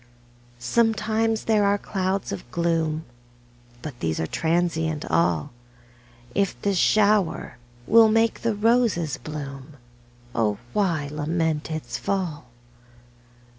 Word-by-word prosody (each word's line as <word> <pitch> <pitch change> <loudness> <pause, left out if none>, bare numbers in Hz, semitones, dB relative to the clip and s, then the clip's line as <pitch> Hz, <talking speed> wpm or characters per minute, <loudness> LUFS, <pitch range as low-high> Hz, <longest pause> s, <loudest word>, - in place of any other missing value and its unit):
Sometimes 225 - +1
there 215 -2 +3
are 200 0 +3
clouds 190 -1 -2
of 100 +4 -6
gloom, 165 0 0 0.8
But 140 -6 -7
these 80 -1 -1
are 80 - 0
transient 160 - 0
all; 85 -1 +1 0.8
If 195 -1 0
the 200 - +2
shower 200 - +2 0.3
will 225 0 +6
make 225 +1 +2
the 230 -2 0
roses 215 - +2
bloom, 140 -1 -8 0.6
O 105 -3 +1 0.2
why 170 -8 +1
lament 155 +1 -1
its 155 -1 -4
fall? 175 -9 -2
170 Hz, 105 wpm, -24 LUFS, 150-210 Hz, 0.8 s, will